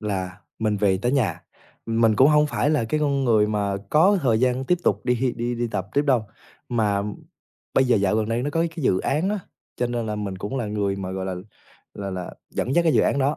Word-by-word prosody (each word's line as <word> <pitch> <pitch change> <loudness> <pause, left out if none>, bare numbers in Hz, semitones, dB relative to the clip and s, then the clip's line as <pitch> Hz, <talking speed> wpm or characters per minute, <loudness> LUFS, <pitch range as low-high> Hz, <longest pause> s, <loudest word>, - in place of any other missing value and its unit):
là 95 -2 -4 0.2
mình 110 -2 0
về 95 -2 +2
tới 120 +5 0
nhà, 110 - 0 0.4
mình 115 -1 +2
cũng 135 +3 +6
hông 150 0 +4
phải 145 0 0
là 150 -7 +1
cái 150 +7 -1
con 140 -2 +1
người 110 -3 +4
mà 100 -2 -1
có 185 +6 +5
thời 115 -4 +2
gian 130 +1 +1
tiếp 180 +4 +1
tục 100 - +2
đi 125 0 +1
đi 120 +1 -2
đi 120 0 -2
tập 100 -2 -3
tiếp 145 - +3
đâu, 130 -6 +2 0.4
mà 105 -4 +1 0.7
bây 135 - +4
giờ 125 -3 +3
dạo 100 +1 +1
gần 110 0 0
đây 115 +2 0
nó 145 - -2
có 165 +2 0 0.2
cái 155 - -4
dự 95 - +3
án 155 +7 0
á, 210 -2 -2 0.4
cho 125 - 0
nên 120 -2 -3
là 105 0 -3
mình 100 -3 -4
cũng 105 +8 -4
là 120 - -2
người 100 -2 -1
mà, 95 -1 -5
gọi 95 0 -4
là 95 - -3 0.6
là 100 -1 -5
là, 90 -1 -6 0.2
dẫn 130 - -2
dắt 170 - +4
cái 160 - +4
dự - - +5
án 140 - +1
đó, 140 +3 +1
115 Hz, 245 wpm, -23 LUFS, 100-135 Hz, 0.7 s, cũng